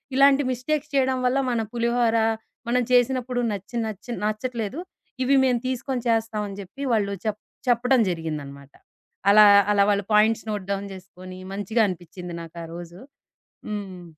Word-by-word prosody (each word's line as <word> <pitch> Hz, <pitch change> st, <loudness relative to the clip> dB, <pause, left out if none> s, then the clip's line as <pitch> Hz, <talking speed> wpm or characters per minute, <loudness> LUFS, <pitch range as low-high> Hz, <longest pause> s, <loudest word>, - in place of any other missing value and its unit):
ఇలాంటి 275 Hz, +1 st, +5 dB
మిస్టేక్స్ 295 Hz, +4 st, -2 dB
చేయడం 265 Hz, -1 st, +2 dB
వల్ల, 250 Hz, +2 st, +2 dB
మన 235 Hz, -2 st, 0 dB
పులిహోర 235 Hz, -1 st, +1 dB, 0.5 s
మనం 250 Hz, +1 st, +2 dB
చేసినప్పుడు 250 Hz, 0 st, +2 dB
నచ్చి 200 Hz, +3 st, -7 dB
నచ్చి 215 Hz, +2 st, -7 dB
నచ్చట్లేదు. 220 Hz, +3 st, -2 dB, 0.5 s
ఇవి 275 Hz, +2 st, +4 dB
మేము 250 Hz, -2 st, +2 dB
తీసుకొని 255 Hz, -1 st, -3 dB
చేస్తాం 225 Hz, -1 st, 0 dB
అని 200 Hz, -1 st, -8 dB
జెప్పి. 200 Hz, +9 st, -9 dB
వాళ్ళు 200 Hz, -2 st, +1 dB
చెప్ 215 Hz, -1 st, -1 dB, 0.3 s
చెప్పడం 250 Hz, +2 st, +3 dB
జరిగిందనమాట. 145 Hz, -4 st, -6 dB, 0.6 s
అలా, 215 Hz, +1 st, +8 dB, 0.3 s
అలా 200 Hz, -1 st, +4 dB
వాళ్ళు 200 Hz, -1 st, 0 dB
పాయింట్స్ 220 Hz, +1 st, +3 dB
నోట్ 205 Hz, -3 st, -4 dB
డౌన్ 200 Hz, 0 st, -3 dB
జేసుకొని, 185 Hz, 0 st, -11 dB
మంచిగా 210 Hz, +3 st, +1 dB
అనిపిచింది 180 Hz, 0 st, -7 dB
నాకా 165 Hz, +1 st, -9 dB
రోజు. 175 Hz, +1 st, -9 dB, 0.7 s
హ్మ్. 195 Hz, -4 st, -6 dB
215 Hz, 140 wpm, -24 LUFS, 190-250 Hz, 0.7 s, అలా